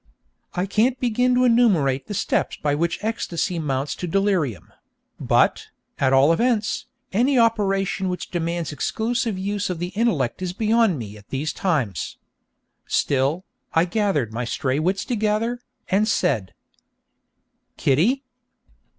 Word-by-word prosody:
I 180 - 0
can't 230 +6 +1
begin 250 0 +2
to 250 - +3
enumerate 195 - +3
the 205 - -4
steps 200 - 0
by 145 -1 0
which 170 +3 0
ecstasy 185 -5 -2
mounts 140 -2 -1
to 180 - -4
delirium; 180 - 0 0.5
but, - - +2 0.3
at 135 -1 +3
all 135 +4 +5
events, 220 +1 0 0.3
any 255 +6 +3
operation 195 -4 +1
which 180 -1 -5
demands 170 -2 -2
exclusive 225 - -1
use 200 +1 -2
of 180 - -2
the 175 +2 -3
intellect 190 - 0
is 180 -1 -3
beyond 220 -3 +2
me 105 -4 -7
at 105 - -18
these 145 +4 -2
times. 135 - -1 0.7
Still, 140 +6 +1 0.3
I 165 +2 +5
gathered 180 - 0
my 120 +2 -2
stray 130 +3 -1
wits 185 +5 0
together, 225 +1 0 0.3
and 205 +3 +2
said: 110 - 0 1.2
'Kitty!' 205 - +2
185 Hz, 135 wpm, -23 LUFS, 145-220 Hz, 1.2 s, all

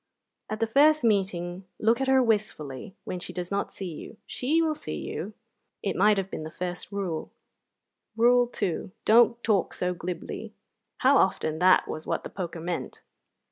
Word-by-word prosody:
"At 215 - -3
the 225 - +2
first 290 +5 +4
meeting 185 -4 0
look 230 +4 +2
at 270 - 0
her 265 -1 +5
wistfully 190 - -2
when 180 - -4
she - - -7
does 180 0 -5
not 200 0 -1
see 190 -3 -6
you. 205 - -10
She 295 +6 0
will 320 -2 +2
see 305 - -6
you." 210 +1 -5 0.5
It 200 - -1
might 210 +2 +4
have 195 0 -2
been 155 0 -5 0.4
Rule 195 -6 -2
One. - - -11 1.0
Rule 245 0 +5
Two: 185 -5 -3
"Don't 235 +1 +5
talk 210 -4 +1
so 180 0 -1
glibly." 175 0 -6 0.5
How 270 +2 +6
often 160 -4 +1
that 185 +1 +5
was 155 - -6
what - - -1
the - - -7
poker 170 -3 -5
meant! 170 +1 -4
200 Hz, 170 wpm, -27 LUFS, 180-235 Hz, 1.0 s, How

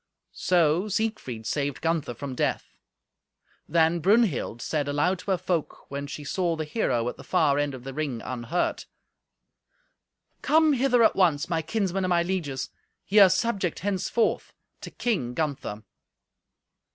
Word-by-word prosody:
So 175 +1 +2
Siegfried 210 - -3
saved 145 +3 -2
Gunther 160 -7 -1
from 140 +2 -6
death. - - -2 1.0
Then 165 +1 +3
Brunhild 190 - +2
said 145 +3 -2
aloud 150 +6 +1
to 185 - -8
her 190 - +3
folk, 170 -6 -3
when 140 0 -4
she 150 +1 -7
saw 170 +3 -1
the 160 - -3
hero 125 - 0
at 125 - -4
the - - -11
far 150 -6 +2
end 145 -2 -1
of 125 - -11
the 135 0 -7
ring 140 -5 -3
unhurt. 130 +9 -2 1.5
"Come 315 -1 +4
hither 250 -2 +3
at - - +4
once, 170 -4 +2
my 165 -2 0
kinsmen 195 +2 -1
and 185 - 0
my 170 -1 +3
lieges. 165 -8 -3 0.3
Ye 210 +2 +4
are 195 -2 +9
subject 190 -3 0
henceforth 205 +4 -1 0.3
to - - -7
King 135 - -2
Gunther." 140 -9 -3
165 Hz, 150 wpm, -26 LUFS, 140-190 Hz, 1.5 s, are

